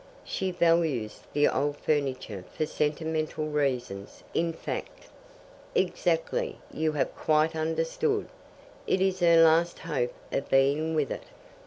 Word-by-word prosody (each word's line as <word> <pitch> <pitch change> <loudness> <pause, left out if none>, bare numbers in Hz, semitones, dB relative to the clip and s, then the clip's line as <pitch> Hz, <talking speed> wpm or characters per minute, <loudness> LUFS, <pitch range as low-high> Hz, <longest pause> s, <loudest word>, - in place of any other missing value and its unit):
'" - - -25
"She 190 - -2
values 165 -10 +1
the 145 0 +4
old 145 0 0
furniture 130 -11 -1
for 155 - +1
sentimental 155 +1 -1
reasons, 125 -9 -2
in 165 0 +1
fact." 165 - -6 0.7
"Exactly. - - 0 0.2
You 155 0 0
have 150 - -1
quite 155 +1 +2
understood. 165 - 0 0.6
It 185 - +2
is 190 -1 +1
her 170 -2 +6
last 165 +2 +4
hope 135 -7 -2 0.2
of 140 - -2
being 145 +4 +3
with 150 -5 0
it." - - -5
155 Hz, 130 wpm, -28 LUFS, 145-170 Hz, 0.7 s, her